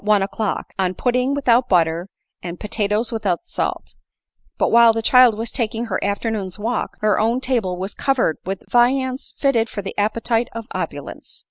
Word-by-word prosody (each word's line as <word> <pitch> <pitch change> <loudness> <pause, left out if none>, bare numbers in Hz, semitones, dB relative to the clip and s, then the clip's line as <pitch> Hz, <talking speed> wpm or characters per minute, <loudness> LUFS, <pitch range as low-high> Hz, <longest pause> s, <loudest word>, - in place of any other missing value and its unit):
one 210 -1 +3
o'clock, 200 +1 -3
on 185 -1 0
pudding 250 +4 0
without 250 -3 +2
butter, 170 0 +2 0.3
and 175 0 -7
potatoes 210 +2 -1
without 205 -6 -1
salt; - - -3 0.6
but - - +1
while 235 -1 +7
the 225 - -2
child 250 -2 +6
was 225 +1 -3
taking 230 0 -2
her - - -1
after 200 +3 -1
noon's 195 -4 -4
walk, 225 +3 -3
her 215 -1 +2
own 230 +3 +1
table 235 -9 -1
was 190 +2 -4
covered 265 - 0
with 195 +1 -5
viands 255 +2 +1
fitted 235 -5 +1
for 205 - -5
the 195 - -6
appetite 230 +3 0
of 230 -1 -6
opulence. - - -6
225 Hz, 170 wpm, -20 LUFS, 200-240 Hz, 0.6 s, while